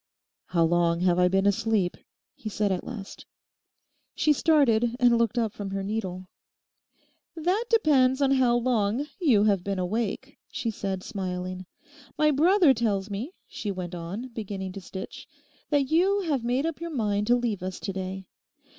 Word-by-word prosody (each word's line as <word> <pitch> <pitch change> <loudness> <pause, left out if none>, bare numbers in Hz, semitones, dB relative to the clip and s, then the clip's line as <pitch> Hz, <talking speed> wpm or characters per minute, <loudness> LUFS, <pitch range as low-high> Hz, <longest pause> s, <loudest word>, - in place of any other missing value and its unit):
'How 170 -2 +2
long 170 0 +2
have 180 -1 +3
I 180 - +5
been 195 +2 +1
asleep?' 205 -2 +1 0.4
he 220 - -7
said 210 -1 0
at 185 - -1
last. 220 -6 -8 0.9
She 305 - +3
started 240 -7 +3
and 245 -1 +5
looked 235 0 +1
up 225 -3 0
from 205 -2 -6
her 195 0 -3
needle. 190 -3 -4 1.1
'That 360 +8 0
depends 275 - +4
on 275 -1 +3
how 255 -3 +3
long 240 +1 0
you 255 - +4
have 200 -4 +2
been 195 0 -2
awake,' 220 +8 -3
she 230 - -3
said, 195 -3 -4
smiling. 185 -3 -5 0.5
'My 305 0 +4
brother 330 +1 +5
tells 210 -4 -1
me,' 235 - -5
she 210 - -5
went 180 -2 -4
on, 180 +9 -6
beginning 200 -5 -5
to 195 - -8
stitch, 190 +1 -8 0.4
'that 285 -2 +1
you 385 +5 +3
have 295 -9 -1
made 250 +5 0
up 330 -1 -3
your 335 - -4
mind 210 -7 -1
to 245 - +5
leave 235 -6 -1
us 185 0 -5
to 195 - -3
day. 190 0 -5
220 Hz, 165 wpm, -26 LUFS, 190-260 Hz, 1.1 s, I